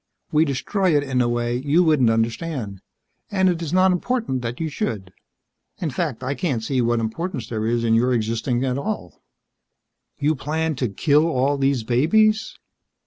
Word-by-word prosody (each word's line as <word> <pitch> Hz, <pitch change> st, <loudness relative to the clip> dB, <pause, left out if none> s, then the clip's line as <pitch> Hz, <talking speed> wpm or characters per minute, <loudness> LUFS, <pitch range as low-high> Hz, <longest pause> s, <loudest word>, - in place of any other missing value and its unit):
We 155 Hz, +1 st, +4 dB
destroy 155 Hz, +5 st, +1 dB
it 145 Hz, -, +1 dB
in 130 Hz, -3 st, 0 dB
a 120 Hz, -, +1 dB
way 120 Hz, 0 st, -1 dB
you 145 Hz, +7 st, +2 dB
wouldn't 150 Hz, -8 st, +3 dB
understand, 115 Hz, -, -2 dB, 0.5 s
and 190 Hz, -2 st, +2 dB
it 175 Hz, -2 st, -1 dB
is 160 Hz, -3 st, -4 dB
not 185 Hz, +1 st, +4 dB
important 180 Hz, -, -1 dB
that 120 Hz, 0 st, -5 dB
you 165 Hz, -, -1 dB
should. 105 Hz, -10 st, -4 dB, 0.6 s
In 160 Hz, -4 st, -3 dB
fact, 130 Hz, -3 st, -3 dB
I 130 Hz, +2 st, -1 dB
can't 140 Hz, -9 st, -2 dB
see 130 Hz, +2 st, 0 dB
what 120 Hz, 0 st, +1 dB
importance 120 Hz, +2 st, -3 dB
there 110 Hz, -2 st, -2 dB
is 120 Hz, 0 st, 0 dB
in 115 Hz, -1 st, +2 dB
your 120 Hz, +3 st, +3 dB
existing 115 Hz, +2 st, 0 dB
at 130 Hz, +1 st, -1 dB
all." 140 Hz, -, -5 dB, 1.0 s
"You 145 Hz, +2 st, +1 dB
plan 155 Hz, +3 st, -2 dB
to 125 Hz, -3 st, -1 dB
kill 150 Hz, -, +2 dB
all 140 Hz, -2 st, +1 dB
these 135 Hz, -3 st, +1 dB
babies?" 215 Hz, -, +2 dB
135 Hz, 175 wpm, -22 LUFS, 120-160 Hz, 1.0 s, We